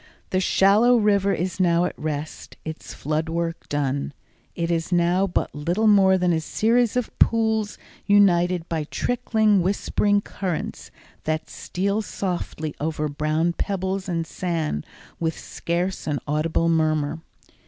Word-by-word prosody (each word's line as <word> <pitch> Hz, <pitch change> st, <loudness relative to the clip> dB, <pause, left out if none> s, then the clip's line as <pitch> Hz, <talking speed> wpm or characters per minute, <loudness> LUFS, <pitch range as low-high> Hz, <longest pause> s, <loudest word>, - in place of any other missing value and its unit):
The 185 Hz, -, +2 dB
shallow 210 Hz, +6 st, +4 dB
river 200 Hz, -2 st, +3 dB
is 185 Hz, 0 st, -2 dB
now 175 Hz, -1 st, +3 dB
at -, -, -2 dB
rest, 155 Hz, 0 st, -5 dB
its 160 Hz, 0 st, -7 dB
flood 155 Hz, +2 st, -2 dB
work 165 Hz, 0 st, -3 dB
done. 140 Hz, -1 st, -1 dB, 0.4 s
It 170 Hz, 0 st, -1 dB
is 165 Hz, +1 st, -1 dB
now 175 Hz, +2 st, +3 dB
but 175 Hz, -, -1 dB
little 175 Hz, +9 st, -1 dB
more 195 Hz, -3 st, +6 dB
than 180 Hz, -1 st, +2 dB
a 160 Hz, -, +1 dB
series 230 Hz, +8 st, +1 dB
of 250 Hz, -, -1 dB
pools 220 Hz, -2 st, +2 dB, 0.3 s
united 180 Hz, -4 st, +4 dB
by 160 Hz, -2 st, -2 dB
trickling, 220 Hz, 0 st, +1 dB
whispering 205 Hz, +2 st, +1 dB
currents 185 Hz, -5 st, -4 dB, 0.4 s
that 155 Hz, 0 st, -2 dB
steal 200 Hz, +4 st, -2 dB
softly 175 Hz, -7 st, -4 dB
over 155 Hz, 0 st, -1 dB
brown 155 Hz, +3 st, 0 dB
pebbles 190 Hz, +1 st, -2 dB
and 165 Hz, -2 st, -1 dB
sand 160 Hz, -, -3 dB, 0.3 s
with 160 Hz, -1 st, -1 dB
scarce 175 Hz, +2 st, -3 dB
an 150 Hz, -2 st, 0 dB
audible 155 Hz, +3 st, +1 dB
murmur. 155 Hz, -1 st, +1 dB
175 Hz, 135 wpm, -24 LUFS, 160-200 Hz, 0.4 s, more